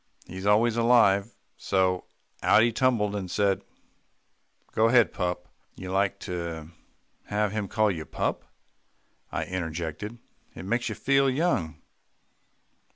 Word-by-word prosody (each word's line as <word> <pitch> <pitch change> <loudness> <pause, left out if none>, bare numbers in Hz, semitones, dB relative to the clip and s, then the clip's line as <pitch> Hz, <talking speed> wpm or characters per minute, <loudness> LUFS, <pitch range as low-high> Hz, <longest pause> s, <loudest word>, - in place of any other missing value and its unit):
"He's 95 +2 -6
always 110 +3 +3
alive, 115 -3 +4 0.2
so 95 -1 0 0.4
out 105 +2 +5
he 120 - +3
tumbled, 110 -4 +1
and 95 -3 -4
said, 100 0 +1 1.1
'Go 110 +1 +3
ahead, 120 -2 +4
pup.'" 90 -1 -3 0.3
"You 95 0 -7
like 100 +1 +1
to 85 -3 -5 0.6
have 105 -1 0
him 105 -1 -3
call 110 0 +2
you 80 -4 -5
pup," - - -2 0.9
I - - -2
interjected. 85 +4 -4 0.4
"It - - -8
makes 120 +4 -1
you - - -4
feel 135 0 +2
young." 130 - 0
100 Hz, 125 wpm, -27 LUFS, 90-115 Hz, 1.1 s, out